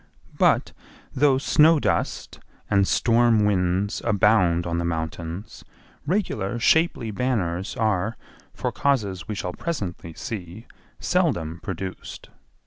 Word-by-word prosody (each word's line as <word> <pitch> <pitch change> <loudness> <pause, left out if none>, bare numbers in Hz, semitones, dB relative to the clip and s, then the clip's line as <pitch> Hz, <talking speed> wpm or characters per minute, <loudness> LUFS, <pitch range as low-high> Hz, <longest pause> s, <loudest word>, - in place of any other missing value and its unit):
But, - - +3 0.4
though 135 0 +3
snow 155 +3 +4
dust 100 -10 -2 0.3
and 100 -1 +3
storm 115 -2 +3
winds 95 +1 0
abound 100 -6 +3
on 85 -1 -1
the - - -1
mountains, 85 +3 -5 0.4
regular 150 - -1
shapely 125 -3 +2
banners 95 -6 -2
are, 110 0 0 0.3
for - - -3
causes 105 - -1
we 105 - -3
shall 90 -2 -4
presently 90 - -5
see, 100 +1 -7 0.3
seldom 85 - 0
produced. 95 0 -7
100 Hz, 110 wpm, -24 LUFS, 90-120 Hz, 0.4 s, snow